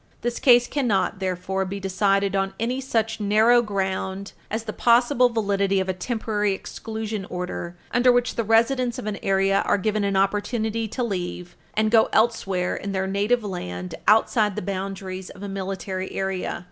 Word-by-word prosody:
This 240 0 -2
case 245 -2 +6
cannot, 220 -8 0
therefore, 190 0 -2
be 195 +1 -5
decided 195 +1 +1
on 195 0 -1
any 245 +4 -1
such 225 -4 -1
narrow 215 +4 +4
ground 195 -2 -3 0.2
as 220 +1 -2
the 215 -1 -5
possible 245 +1 +4
validity 200 -3 +1
of 190 - -1
a 185 - 0
Temporary 210 +1 -1
Exclusion 220 +1 -5
Order 180 -1 -5
under 245 +1 +4
which 245 0 +1
the 230 - -1
residents 235 +3 +2
of 250 - -6
an 210 -1 -3
area 195 0 +2
are - - +2
given 215 +1 0
an 200 -1 0
opportunity 215 +3 0
to 235 +4 -3
leave 180 -4 -4 0.2
and 215 0 +2
go 225 -1 +5
elsewhere 195 -5 +1
in 200 0 -5
their 190 0 0
native 205 +5 +1
land 90 - -5
outside 215 -1 +4
the - - -4
boundaries 190 -1 -5
of 195 - -11
a - - -4
military 190 -1 -4
area. 190 -1 -2
200 Hz, 170 wpm, -24 LUFS, 190-225 Hz, 0.2 s, case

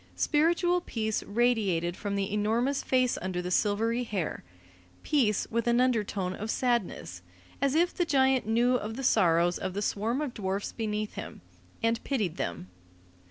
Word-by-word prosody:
Spiritual 345 +3 +2
peace 220 -9 -2
radiated 200 -7 +1
from 200 0 -3
the 200 0 -2
enormous 230 +6 +1
face 255 -1 +1
under 185 -1 -3
the 180 0 -4
silvery 225 +5 +1
hair, 200 -8 -3 0.6
peace 245 -9 +2
with 235 +1 -1
an 240 0 +3
undertone 210 -7 0
of 215 +3 -6
sadness, 225 - -1 0.4
as 280 0 +2
if 345 +2 +3
the 355 - 0
giant 265 -6 +2
knew 240 +3 +3
of 220 -1 -5
the 270 - -5
sorrows 175 -6 +3
of 190 0 -4
the 205 - -1
swarm 225 +6 -1
of 295 -5 -3
dwarfs 195 -1 -3
beneath 215 -2 -3
him, - - -8 0.4
and 230 0 +1
pitied 210 - -1
them. 85 +1 -4
220 Hz, 160 wpm, -29 LUFS, 195-255 Hz, 0.6 s, an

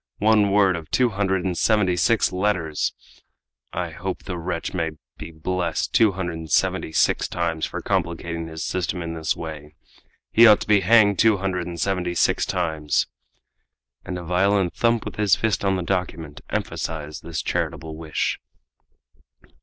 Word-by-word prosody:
One 105 -1 +4
word 100 -2 +4
of 80 -2 -7
two 125 -1 +3
hundred 95 -3 -1
and 90 -2 -1
seventy 105 -2 +2
six 110 +5 +2
letters! 90 -5 -1 0.8
I - - -3
hope - - -5
the 90 - -5
wretch 85 0 -4
may 80 -3 -1 0.3
be - - -7
blessed 85 +1 -2
two 110 -3 +4
hundred 85 -3 -4
and 80 -1 -8
seventy 80 - +1
six - - +2
times 85 -2 -2
for - - -6
complicating 85 0 -2
his 80 0 -5
system 90 -1 -2
in 85 0 -4
this 80 -1 -1
way! 75 -2 -8 0.6
He 115 +1 +8
ought 105 -1 +7
to - - -5
be 105 -1 +5
hanged 100 0 +4
two 110 -2 +5
hundred 95 -2 -2
and 85 -1 -6
seventy 90 -1 -1
six - - +2
times!" 80 -5 0 1.0
And 95 -1 -5
a 90 - -6
violent 95 +1 +1
thump 115 -1 +1
with - - -7
his 105 -5 +4
fist 110 +2 0
on 95 -1 +2
the 90 - -2
document 85 -5 -3
emphasized 75 -1 -4
this 85 -1 -4
charitable 80 -1 -3
wish. 80 -2 -2
90 Hz, 165 wpm, -23 LUFS, 80-100 Hz, 1.0 s, He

